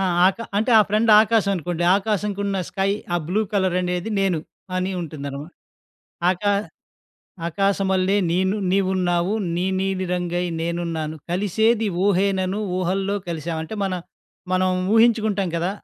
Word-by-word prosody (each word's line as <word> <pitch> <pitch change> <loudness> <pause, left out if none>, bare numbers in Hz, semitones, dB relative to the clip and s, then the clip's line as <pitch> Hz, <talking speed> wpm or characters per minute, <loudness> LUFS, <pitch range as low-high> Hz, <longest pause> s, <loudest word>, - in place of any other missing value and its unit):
ఆ! - - +1 0.3
అక 195 - -2 0.2
అంటే 225 +4 +1
ఆ - - +8
ఫ్రెండ్ 215 +2 +2
ఆకాస్ 220 -2 +2
అనుకోండి. 175 -1 -2
ఆకాశంకున్న 200 -1 -1
స్కై 195 0 0 0.2
ఆ - - +3
బ్లూ 205 +4 +1
కలర్ 190 -3 +1
అనేది 180 +4 -2
నేను 190 -4 +1 0.4
అని 185 +1 -1
ఉంటుందన్నమాట. 145 0 -7 0.8
ఆకా 195 +3 0 1.0
"ఆకాశమల్లే 190 +1 +1 0.2
నేను 190 +3 +1
నీవు 195 0 +2
ఉన్నావు. 175 +1 +1 0.2
నీ 180 - 0 0.2
నీలి 190 -1 -1
రంగై 175 0 -1 0.2
నేనున్నాను. 165 -2 -3
కలిసేది 220 +4 +1 0.2
ఊహేనను, 195 0 +1 0.2
ఊహల్లో 190 +2 0
కలిసాం" 165 0 -3
అంటే 160 - -6
మన 190 - -1 0.6
మనం 185 0 +2 0.3
ఊహించుకుంటాం 220 -4 +3
కదా! 175 +3 0
190 Hz, 130 wpm, -22 LUFS, 175-200 Hz, 1.0 s, ఆ